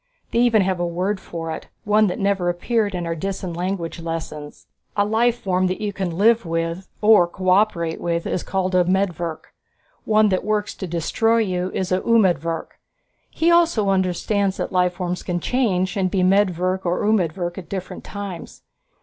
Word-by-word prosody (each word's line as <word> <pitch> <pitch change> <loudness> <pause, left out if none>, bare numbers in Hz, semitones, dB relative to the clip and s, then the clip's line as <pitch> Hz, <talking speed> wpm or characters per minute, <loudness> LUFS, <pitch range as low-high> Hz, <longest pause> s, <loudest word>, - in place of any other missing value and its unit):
They 235 - +1
even 230 -4 +4
have 185 -1 -1
a 175 - 0
word 185 +4 -1
for 165 -3 -6
it, - - -6 0.2
one 210 +1 +3
that 180 - -2
never 195 -3 +1
appeared 205 +3 0
in 175 -1 -3
our 165 - -1
Disan 185 0 -4
language 175 -1 -3
lessons. 160 -3 -6 0.3
A 205 - +3
life 230 +3 +2
form 185 -1 +1
that 185 - -2
you 210 -1 -3
can 180 -4 -3
live 230 +3 +4
with 165 +2 -3
or 210 -5 +6
cooperate 185 -2 +1
with 170 -1 -1
is 180 - -1
called 190 -1 -2
medvirk. 180 -3 0 0.5
One 215 -1 +4
that 185 - 0
works 210 0 -1
to 190 - -6
destroy 175 +7 +1
you 185 -4 0
is 185 -1 -2
umedvirk. 185 -5 +1 0.5
He 335 +1 +1
also 330 -13 +3
understands 190 +1 0
that - - -3
life 180 -1 +2
forms 180 0 -3
can 175 -1 -2
change, 190 -6 0
and 190 -2 +1
be 185 -1 +1
medvirk 185 -1 +2
or 175 0 0
umedvirk 175 -4 0
at 175 - -11
different 185 -2 -6
times. 200 -4 -8
185 Hz, 170 wpm, -22 LUFS, 175-205 Hz, 0.5 s, or